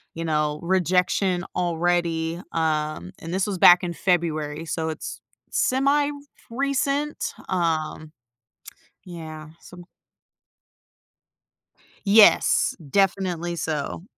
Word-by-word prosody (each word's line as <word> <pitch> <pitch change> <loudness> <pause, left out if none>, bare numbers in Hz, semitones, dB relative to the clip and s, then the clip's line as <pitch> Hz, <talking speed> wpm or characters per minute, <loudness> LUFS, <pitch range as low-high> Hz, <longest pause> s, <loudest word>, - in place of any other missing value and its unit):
you 165 0 -4
know, 150 -1 0
rejection 180 0 +1
already, 170 -1 0
um, 155 - -1
and 165 +2 -7
this 190 +2 0
was 195 -3 -3
back 175 +1 +7
in 170 - -3
February, 160 -4 -1
so 160 +1 -3
it's 160 - -6 0.3
semi 280 +3 +2
fr 285 -1 -7 0.4
recent, 280 +1 -1
um, 160 -3 -2 0.9
yeah, 160 -3 -9
so 175 -1 -13 2.2
Yes. 210 +2 +5
Definitely 180 -2 0
so. 155 +1 -3
175 Hz, 95 wpm, -24 LUFS, 160-190 Hz, 2.2 s, back